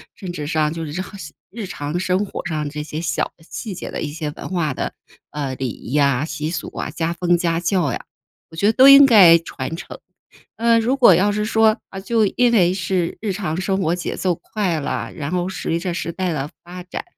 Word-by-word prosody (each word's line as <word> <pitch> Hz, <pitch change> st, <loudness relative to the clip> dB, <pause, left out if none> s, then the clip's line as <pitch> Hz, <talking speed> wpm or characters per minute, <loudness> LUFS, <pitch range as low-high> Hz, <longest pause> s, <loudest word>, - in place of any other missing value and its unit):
甚 180 Hz, -3 st, -7 dB
至 150 Hz, -3 st, -5 dB
上 155 Hz, 0 st, 0 dB
就 165 Hz, -1 st, -5 dB
是 155 Hz, +5 st, -4 dB
好 195 Hz, +1 st, -9 dB
像 155 Hz, -5 st, -9 dB, 0.2 s
日 225 Hz, 0 st, -6 dB
常 150 Hz, -2 st, -4 dB
生 185 Hz, +2 st, 0 dB
活 195 Hz, -, -7 dB
上 155 Hz, -3 st, -2 dB
这 150 Hz, 0 st, -5 dB
些 155 Hz, +1 st, -5 dB
小 155 Hz, -2 st, -1 dB
的 160 Hz, -, -21 dB
细 215 Hz, -5 st, -5 dB
节 185 Hz, -, -7 dB
的 -, -, -4 dB
一 150 Hz, -, -3 dB
些 155 Hz, -1 st, -4 dB
文 -, -, -8 dB
化 170 Hz, -7 st, -1 dB
的， -, -, -3 dB, 0.4 s
呃， 140 Hz, -3 st, -3 dB
礼 130 Hz, -1 st, -3 dB
仪 120 Hz, -, -8 dB
呀、 140 Hz, -1 st, +2 dB
习 155 Hz, -1 st, -4 dB
俗 165 Hz, -, -4 dB
啊、 -, -, -3 dB
家 165 Hz, +2 st, -2 dB
风 175 Hz, 0 st, +2 dB
家 165 Hz, -1 st, 0 dB
教 170 Hz, -5 st, +1 dB
呀， -, -, -6 dB, 0.4 s
我 160 Hz, -, -13 dB
觉 200 Hz, -, -1 dB
得 220 Hz, -, +4 dB
都 265 Hz, +3 st, +7 dB
应 275 Hz, 0 st, +10 dB
该 190 Hz, -9 st, +8 dB
传 160 Hz, -2 st, -6 dB
承。 170 Hz, -, -9 dB, 0.6 s
呃， 230 Hz, 0 st, +3 dB
如 245 Hz, +4 st, +1 dB
果 240 Hz, -9 st, +7 dB
要 200 Hz, +5 st, +3 dB
是 210 Hz, 0 st, -1 dB
说， 220 Hz, 0 st, +3 dB
啊， 195 Hz, -, -7 dB
就 220 Hz, +2 st, +1 dB
因 245 Hz, -1 st, +4 dB
为 180 Hz, -6 st, +4 dB
是 180 Hz, -2 st, -1 dB
日 210 Hz, -3 st, -2 dB
常 180 Hz, -3 st, -3 dB
生 190 Hz, +1 st, 0 dB
活 170 Hz, -1 st, +1 dB
节 180 Hz, -, -4 dB
奏 180 Hz, -2 st, 0 dB
快 185 Hz, -3 st, -2 dB
了， 115 Hz, -4 st, -3 dB
然 145 Hz, 0 st, -5 dB
后 180 Hz, 0 st, -1 dB
随 170 Hz, -3 st, -2 dB
着 175 Hz, +1 st, -3 dB
时 170 Hz, -1 st, -3 dB
代 185 Hz, -1 st, -2 dB
的 145 Hz, -1 st, -3 dB, 0.2 s
发 180 Hz, +1 st, -9 dB
展， 180 Hz, -, -6 dB
175 Hz, 250 characters per minute, -20 LUFS, 155-195 Hz, 0.6 s, 应